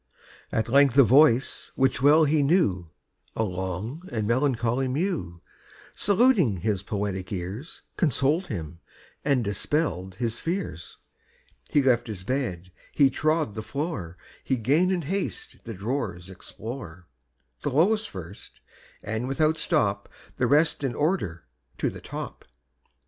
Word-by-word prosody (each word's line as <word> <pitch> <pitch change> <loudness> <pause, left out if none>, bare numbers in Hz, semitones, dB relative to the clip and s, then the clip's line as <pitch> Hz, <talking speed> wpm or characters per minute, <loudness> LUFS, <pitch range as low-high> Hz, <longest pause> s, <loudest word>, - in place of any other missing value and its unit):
At 110 - 0
length 135 +1 +4
a 140 - +9
voice 130 0 +4
which 130 -1 +1
well 150 +3 +6
he 150 +1 +3
knew, 120 - +2 0.5
A 110 - +1
long 95 - -4
and 110 -4 -1
melancholy 125 0 +1
mew, 130 - -2 0.5
Saluting 200 - +3
his 100 -2 0
poetic 100 -3 -3
ears, 100 - -6
Consoled 155 +3 +1
him 80 0 -6 0.4
and 140 -4 +2
dispell'd 100 - -1
his 115 +2 -2
fears: 165 - -4 0.7
He 145 - +3
left 120 -3 +3
his 100 -5 -5
bed, 95 -7 -3 0.2
he 140 -2 +4
trod 155 -6 0
the 110 - -4
floor, 105 - -4 0.3
He 130 - +1
'gan 145 +11 +2
in 180 -3 0
haste 200 - -3
the 115 - -5
drawers 100 -4 -3
explore, 95 -2 -8 0.6
The - - -1
lowest 195 +11 +2
first, 95 0 -10 0.4
and 110 +4 -3
without 155 +4 +1
stop - - +1 0.3
The - - +2
rest 150 +1 +3
in 135 -3 -1
order 145 - -1 0.3
to - - 0
the - - -10
top. - - -7
125 Hz, 135 wpm, -26 LUFS, 95-150 Hz, 0.7 s, a